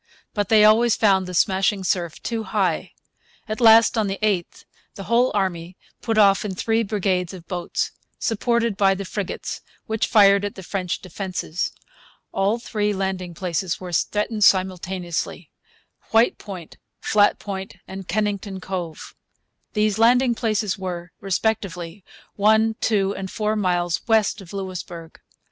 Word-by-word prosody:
But 205 -2 -1
they 215 -1 +6
always 220 +2 +5
found 190 -3 +3
the 180 - -5
smashing 195 +2 +2
surf 175 -3 -1
too 230 -1 -2
high. 195 -6 -1 0.5
At 215 +3 -4
last, 225 0 +6
on 215 - +1
the 195 0 -3
8th, 195 -5 -1 0.3
the 195 - -7
whole 235 +5 +3
army 180 -3 -2 0.2
put 225 -1 -1
off 200 -2 +5
in 200 -3 -4
three 225 +4 +1
brigades 190 -4 -1
of 170 -2 -13
boats, 175 -2 -2 0.3
supported 235 0 0
by 195 -1 +3
the 195 +1 -5
frigates, 195 0 -5 0.2
which 220 0 -1
fired 200 -2 +5
at 205 - -3
the 190 - -9
French 180 -1 -3
defences. 185 -2 -3 0.6
All 200 +4 +1
three 210 -3 -1
landing 190 -3 -3
places 180 0 -2
were 180 -1 -7
threatened 210 +5 0
simultaneously, 185 -2 0 0.6
White 225 +2 +3
Point, 185 -6 -9 0.2
Flat 205 -1 +3
Point, 195 -1 -6
and 190 -1 -8
Kennington 200 0 -2
Cove. 180 -4 -6 0.6
These 210 -1 +1
landing 245 +2 +5
places 215 -3 -1
were, 175 -2 -5
respectively, 195 -3 -2 0.3
one, 220 +2 +4
two, 200 -3 +1
and 195 -1 -5
four 215 +1 -1
miles 175 -4 0
west 220 -2 +2
of 180 - -12
Louisbourg. 180 -4 -7
195 Hz, 145 wpm, -23 LUFS, 185-215 Hz, 0.6 s, they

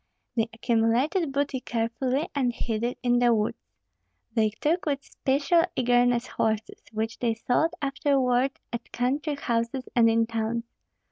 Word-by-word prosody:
They 225 -1 +1
accumulated 235 - +1
booty 280 -1 -1
carefully, 250 +5 -1
and 260 -4 +1
hid 225 -1 -3
it 240 +1 -1
in 245 -1 +3
the 240 -1 +4
woods. 210 0 -1 0.7
They 220 -2 +3
took 305 - -1
with 280 -1 -1
special 285 +5 +2
eagerness 245 0 +3
horses, 220 -1 -2
which 225 +1 -3
they 230 -2 +1
sold 315 +9 +1
afterward 270 -2 +1 0.2
at 235 0 -5
country 285 +5 -1
houses 235 -1 -2
and 230 -2 +6
in 225 0 +3
towns. 225 0 -2
245 Hz, 140 wpm, -26 LUFS, 230-275 Hz, 0.7 s, and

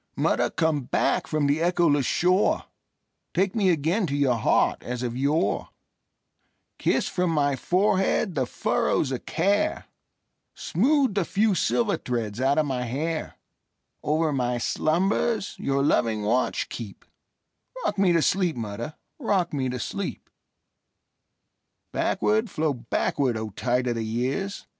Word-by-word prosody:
Mother, - - +1
come 160 -5 0
back - - 0
from 155 -2 0
the 145 +2 +2
echoless 165 -6 +2
shore, 180 - +2 0.7
Take 190 +1 +2
me 205 -4 +2
again 175 +5 +1
to 140 - -2
your 140 -3 +3
heart 115 - +2
as 125 0 -4
of 120 -1 -3
yore; 140 +5 0 1.1
Kiss - - +1
from 180 -1 0
my 145 -3 +1
forehead 190 - +1
the 130 -5 -1
furrows 135 - 0
of 130 - -5
care, 200 +5 +1 0.7
Smooth 265 - +2
the 195 -1 +1
few 205 +4 +1
silver 210 +3 +1
threads 115 -2 -3
out 135 +2 +2
of 155 - +3
my 130 -3 -2
hair; 155 +7 -3 0.7
Over 155 0 +1
my 125 -2 0
slumbers 190 - 0
your 140 0 0
loving 110 -6 +1
watch 120 +5 0
keep;—Rock 195 - -8
me 190 -2 +4
to 165 -2 +3
sleep, 180 -4 +1
mother,—rock 155 - -3
me 130 -3 -1
to 125 - -3
sleep! 115 - -5 1.6
Backward, 105 +1 +1
flow 155 -1 0
backward, 125 +1 -1
O 110 -1 -5
tide 125 +5 0
of 120 - 0
the 115 -1 -3
years! 130 - -2
150 Hz, 135 wpm, -25 LUFS, 125-185 Hz, 1.6 s, me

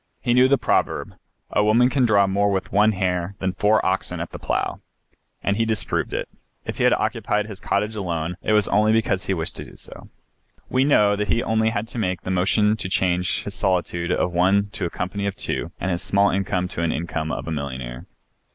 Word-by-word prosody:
He 120 - +1
knew 125 +1 +6
the 140 +1 +4
proverb, - - 0 0.4
"a 105 - +2
woman 115 +4 +4
can 130 -4 +3
draw 100 -3 +4
more 100 +1 +1
with 95 -1 -2
one 105 +2 +4
hair 90 -1 -1
than 95 -1 -2
four 105 +3 +2
oxen 95 +1 -1
at - - -5
the - - -8
plough," - - -1 0.7
and 100 0 +1
he 115 - +2
disproved 110 -2 -1
it. - - -3 0.4
If - - -5
he - - +3
occupied 105 0 0
his 105 -3 -9
cottage 105 +3 -1
alone 85 -4 -2
it 110 - 0
was 105 -2 +4
only 105 +1 +3
because 105 -3 0
he 95 - +1
wished 80 -2 -3
to - - -6
do - - -14
so. - - -10 0.6
We 130 +1 +3
know 105 -8 +4
that 105 0 -2
he 115 - +1
only 110 0 +2
had 110 0 -3
to 120 - -5
make 90 -4 -1
the 95 - -3
motion 105 +4 +2
to 95 - -4
change 90 -1 +1
his 100 - -6
solitude 90 -3 -1
of 90 - +1
one 95 +3 +3
to 100 - -3
a - - -1
company 100 +4 -3
of 100 - -3
two - - -3
and 95 - -1
his 85 - -1
small 100 0 +3
income 95 -1 -1
to - - -11
the 85 -1 +1
income 80 -1 -3
of 65 - -4
a - - -3
millionaire. 65 -5 -5
100 Hz, 220 wpm, -23 LUFS, 90-105 Hz, 0.7 s, knew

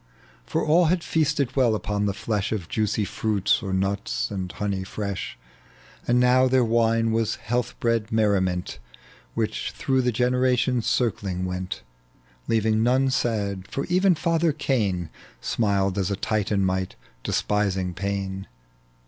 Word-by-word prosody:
For - - 0
all 165 +3 +5
had 170 +1 +1
feasted 150 -5 0
well 125 -5 +3
upon 105 -1 -1
the 100 - 0
flesh 105 -3 -2
Of 100 -7 -3
juicy 105 +1 0
fruits, 105 -1 +1
on 95 -1 -1
nuts, 80 -12 -2
and 95 -2 -4
honey 100 -2 -2
fresh, 100 0 -5 0.7
And 120 +1 +4
now 125 +1 +5
their 130 -1 +3
wine 115 0 +2
was 115 -1 +1
health 120 +2 -3
bred 115 -2 0
merriment, 95 -5 +1 0.6
"Which - - -2
throi^h 130 -1 +1
the 125 - +2
generations 125 0 +1
eirchng 100 -6 0
went, 90 -7 -4 0.6
Leaving 110 -1 +2
none 130 +3 +3
sad, 100 -7 -1
for 140 - -3
even 185 +1 +4
father 165 0 +1
Cain 105 - -1 0.3
Smiled 100 - 0
as 95 0 0
a 100 - 0
Titan 100 -1 0
might, 95 0 -1 0.3
despising 95 -3 0
pain. 95 +1 -3
110 Hz, 140 wpm, -25 LUFS, 95-125 Hz, 0.7 s, all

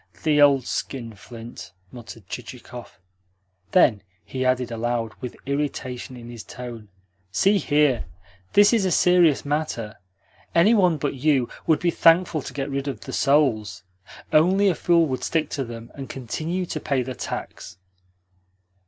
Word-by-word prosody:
"The 150 -2 +3
old 140 -3 +5
skinflint!" 115 -2 -7 0.2
muttered 115 -4 -11
Chichikov. 120 -5 -9 0.7
Then 125 - +4 0.2
he 130 -1 -3
added 130 -1 +1
aloud, 115 -1 -2
with 125 - -6
irritation 130 -3 -3
in 120 -1 -10
his 120 -2 -9
tone: 120 -4 -9 0.4
"See 195 - +3
here. 145 -6 +2 0.5
This 205 +2 +6
is 225 -4 +3
a 190 - +1
serious 175 -5 +4
matter. 140 -8 -3 0.6
Any 180 +7 +5
one 180 -7 +3
but 145 0 -2
you 135 -2 +1 0.2
would 160 -2 +4
be 175 - +1
thankful 165 -1 +4
to - - -8
get 140 0 -4
rid 140 +1 -3
of 140 - -4
the - - -8
souls. 110 - +1 0.5
Only 190 +6 +4
a - - +2
fool 170 +1 +3
would 130 -4 -3
stick 160 -2 -1
to 140 - -2
them, 115 -1 -9
and 135 -2 -8
continue 160 +8 -3
to - - -4
pay 140 -4 0
the 130 +1 -5
tax." 90 - -7
135 Hz, 150 wpm, -24 LUFS, 120-160 Hz, 0.7 s, This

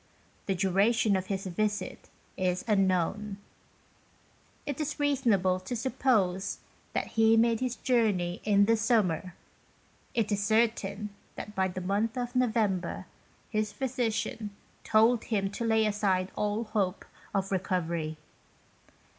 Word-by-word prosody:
The 195 - +1
duration 200 +3 +3
of 190 0 -2
his 195 -1 -3
visit 205 +3 -2 0.3
is 180 -1 -1
un 195 -3 +3
known; 195 +3 -1 1.3
it 285 +1 -3
is 305 0 -3
reasonable 230 -11 +2
to 185 +7 -5
suppose 220 -7 +1 0.4
that - - 0
he 225 0 +4
made 230 0 +3
his 255 -2 -1
journey 210 -10 +1
in 200 -1 +4
the 230 +2 +4
summer, 200 -6 +1 0.8
it 225 -2 +1
is 205 0 +1
certain 210 -2 +1 0.2
that 210 - -7
by 190 -2 +1
the 185 0 -5
month 205 +6 0
of 245 0 -3
November 220 -7 0 0.5
his 215 -2 0
physician 235 -4 -2 0.3
told 225 +2 +4
him 195 -3 0
to 235 - -4
lay 220 -1 +3
aside 195 -3 +1
all 210 +2 0
hope 200 -4 -1 0.3
of 195 0 0
recovery. 170 -4 -1
210 Hz, 130 wpm, -29 LUFS, 190-230 Hz, 1.3 s, he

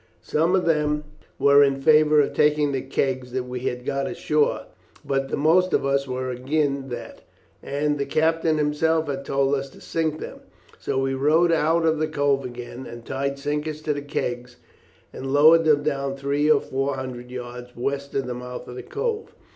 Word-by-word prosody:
Some 165 +4 +1
of 185 - +1
them 150 -2 +1 0.3
were 140 0 +6
in 135 -1 +1
favour 150 +1 +5
of 140 - -1
taking 150 -1 +3
the 135 -1 -1
kegs 130 -1 -2
that 130 -1 -1
we 125 0 -5
had 125 -1 -3
got 140 +2 -1
ashore, 155 -4 0 0.4
but 135 -1 -1
the - - -2
most 170 +5 +3
of - - +2
us 140 0 +1
were 130 0 -3
agin 140 +1 -1
that, 120 - -7 0.4
and 145 +1 -1
the 140 - -1
captain 160 +1 +1
himself 155 +2 +1
had 140 -1 -3
told 135 0 +1
us 135 -1 -1
to - - -16
sink 160 -1 -2
them, - - -8 0.4
so - - -2
we 135 0 0
rowed 155 +6 +3
out 165 +1 +2
of 160 -1 +2
the 155 - +1
cove 145 -3 +1
again 120 0 -8
and 120 -1 -10
tied 140 +1 -2
sinkers 150 +2 -3
to 150 - 0
the 145 - -4
kegs 125 -4 -4 0.6
and 135 0 -5
lowered 160 +3 +6
them 150 -2 +4
down 140 -2 -1
three 140 +2 0
or 155 - +5
four 135 +1 -2
hundred 125 -2 -6
yards 125 0 -8
west 140 +3 -3
of 135 - 0
the 125 - -4
mouth 125 0 -7
of 125 - -8
the 125 - -6
cove. 445 0 -4
140 Hz, 195 wpm, -24 LUFS, 130-155 Hz, 0.6 s, were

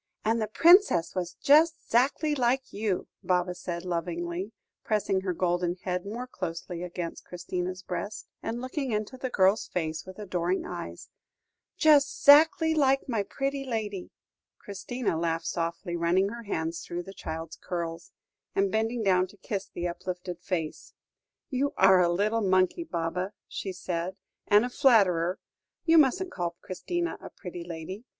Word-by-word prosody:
"And 225 +1 +2
the 215 - 0
Princess 335 - +5
was 180 -1 -3
just 310 +3 +5 0.2
'zactly 280 +6 +3
like 260 -1 0
you," 205 -3 -1
Baba 180 0 +1
said 175 -1 -5
lovingly, 175 +2 -3 0.3
pressing 200 -3 0
her 190 -1 -1
golden 175 0 0
head 180 0 -2
more 235 +5 -4
closely 175 -5 -5
against 175 -1 -5
Christina's 180 +1 -4
breast, 200 +3 -5
and 235 +2 -4
looking 260 0 -3
into 215 +3 -2
the 260 0 -4
girl's 195 -1 +3
face 160 -2 -3
with 185 0 -11
adoring 185 -3 -1
eyes, - - -7 0.7
"just 290 -3 +4
'zactly 320 +2 +7
like 275 -2 +3
my 230 -5 0
pretty 275 +6 -3
lady." 215 -7 -3 0.5
Christina 205 -2 -3
laughed 165 0 -1
softly, 170 +1 -2
running 175 +3 +2
her 235 +1 -8
hands 165 -4 -2
through 175 +1 -5
the 195 - -10
child's 165 -1 -6
curls, 170 -1 -4 0.4
and 195 -1 +2
bending 225 +1 0
down 185 -2 +3
to 205 - -18
kiss 195 0 -4
the 175 0 -3
uplifted 180 0 -5
face. 175 -5 -4 0.6
"You 275 +2 0
are 190 -1 +6
a 175 - +3
little 210 +6 +1
monkey, 185 - +2
Baba," 180 - -2
she 195 - -5
said, 180 0 -3 0.3
"and 210 +3 +5
a - - -3
flatterer. 190 - +4 0.5
You 330 0 +6
mustn't 355 +6 +2
call 175 -1 -3
Christina 345 - -3
a - - -8
pretty 180 -3 -8
lady. 175 +6 -7
190 Hz, 150 wpm, -28 LUFS, 175-240 Hz, 0.7 s, zactly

